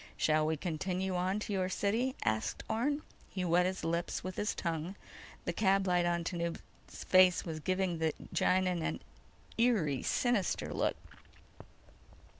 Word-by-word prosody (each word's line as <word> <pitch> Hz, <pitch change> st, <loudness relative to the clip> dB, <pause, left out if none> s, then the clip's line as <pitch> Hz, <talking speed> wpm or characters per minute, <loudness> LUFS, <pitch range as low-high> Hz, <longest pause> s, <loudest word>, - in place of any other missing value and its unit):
"Shall 155 Hz, 0 st, +3 dB
we 160 Hz, 0 st, 0 dB
continue 185 Hz, +3 st, -2 dB
on 185 Hz, +2 st, 0 dB
to 210 Hz, -, -3 dB
your 185 Hz, -1 st, 0 dB
city?" 225 Hz, +7 st, 0 dB
asked 110 Hz, 0 st, -1 dB
Orne. 285 Hz, +7 st, 0 dB, 0.3 s
He 185 Hz, -2 st, -3 dB
wet 175 Hz, +1 st, +3 dB
his 190 Hz, -1 st, -3 dB
lips 170 Hz, +1 st, -1 dB
with 185 Hz, 0 st, -5 dB
his 210 Hz, -, -1 dB
tongue. 170 Hz, +2 st, -3 dB, 0.5 s
The -, -, -1 dB
cab 195 Hz, -1 st, +3 dB
light 180 Hz, -1 st, +2 dB
on 170 Hz, 0 st, 0 dB
Tanub's 170 Hz, -1 st, -5 dB
face 185 Hz, -1 st, +5 dB
was 160 Hz, -2 st, -4 dB
giving 185 Hz, 0 st, 0 dB
the 160 Hz, -1 st, +2 dB, 0.2 s
Gienahn 185 Hz, -2 st, +2 dB
an -, -, -2 dB, 0.6 s
eerie 190 Hz, -, +2 dB
sinister 240 Hz, -6 st, 0 dB
look. -, -, 0 dB
180 Hz, 145 wpm, -33 LUFS, 170-195 Hz, 0.6 s, face